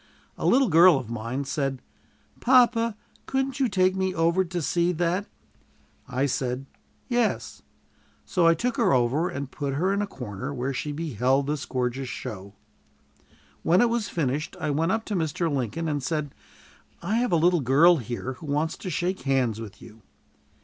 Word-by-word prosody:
A - - -2
little 265 +1 +4
girl 170 -2 +7
of 120 -4 -6
mine 120 +4 -3
said, 135 -1 -2 0.6
"Papa, 235 -3 +4 0.3
couldn't 270 +1 -1
you 260 -3 +2
take 185 -1 +2
me 190 -1 -1
over 170 +3 +2
to 175 0 -4
see 170 +2 +1
that?" 175 +4 -1 0.8
I 130 +2 0
said, 130 -1 -2 0.4
"Yes"; 240 -3 -1 0.6
so 175 -2 +2
I 165 - +5
took 245 +8 -2
her - - +3
over 130 +7 +2
and 140 -1 -5
put 140 -2 -3
her 185 +7 +1
in 200 - 0
a 205 - -2
corner, 125 - -6
where 130 +2 -2
she 150 +3 -3
beheld 135 -3 0
this 145 0 -3
gorgeous 130 0 -2
show. 100 -3 -7 1.1
When 175 +3 +3
it 240 +1 +4
was 235 -3 -1
finished, 150 -2 -2
I 155 - -1
went 165 +5 +1
up 225 +1 -1
to 210 - -3
Mr. 160 -1 -1
Lincoln 135 +5 -2
and 145 -2 -1
said, 145 +1 -2 0.7
"I 205 +6 0
have 245 -3 0
a - - +4
little 170 0 +3
girl 150 +7 +5
here 125 +1 -5
who 155 - -9
wants 150 +3 -1
to 185 - -6
shake 180 +3 -2
hands 125 -5 0
with 110 0 -10
you." 110 -1 -14
155 Hz, 175 wpm, -26 LUFS, 130-185 Hz, 1.1 s, girl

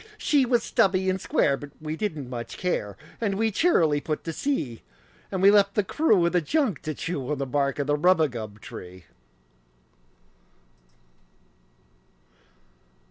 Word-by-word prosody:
She 280 -4 +2
was 240 -2 +2
stubby 190 -6 +2
and 185 0 -3
square, 140 - +2
but 145 +1 -9
we 155 0 -4
didn't 155 -8 -4
much 120 -2 -6
care, 105 - -2 0.2
And 205 -4 0
we 220 +2 +1
cheerily 165 - +2
put 155 0 -3
to 165 - -4
sea; 155 - -2 0.5
And 190 -1 -2
we 200 - +8
left 200 -1 +4
the 210 - +2
crew 210 - +2
of 170 - +2
the 180 - +3
junk 270 - 0
to 155 -2 -4
chew 150 -4 -3
The 140 -1 -3
bark 140 +1 0
of 145 - -1
the 145 +1 +1
rubagub 145 - +1
tree. 90 -1 -10
165 Hz, 145 wpm, -25 LUFS, 140-200 Hz, 0.5 s, we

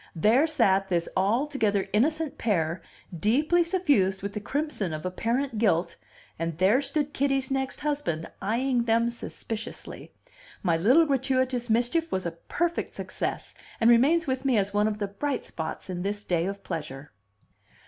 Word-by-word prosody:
There 225 - +4
sat 195 -11 +2
this 170 -2 0
altogether 215 0 +1
innocent 305 +7 +1
pair, 170 -6 0 0.3
deeply 290 - +2
suffused 285 - +1
with 200 0 -4
the 210 - -3
crimson 260 - -2
of 155 +1 -5
apparent 230 +6 -1
guilt, 170 -6 +2 0.4
and 165 -1 -3
there 200 +9 +4
stood 290 0 -1
Kitty's 270 -1 0
next 265 -1 -2
husband, 285 - -2 0.2
eyeing 240 +4 0
them 230 +1 +2
suspiciously. 225 -1 -6 0.5
My 170 -4 +2
little 250 - +5
gratuitous 260 -3 0
mischief 245 +9 +1
was 185 -1 -1
a 170 - -1
perfect 340 - -3
success, - - -4 0.3
and 230 +1 +6
remains 295 +8 +4
with 260 -2 -2
me 265 -4 +2
as 200 0 0
one 210 +1 +3
of 215 -1 -2
the 205 -1 -2
bright 265 +8 -3
spots 160 -1 -6
in 180 -1 -4
this 205 +2 -3
day 175 -2 0
of 200 0 -5
pleasure. 145 -2 -6
225 Hz, 155 wpm, -27 LUFS, 190-275 Hz, 0.5 s, and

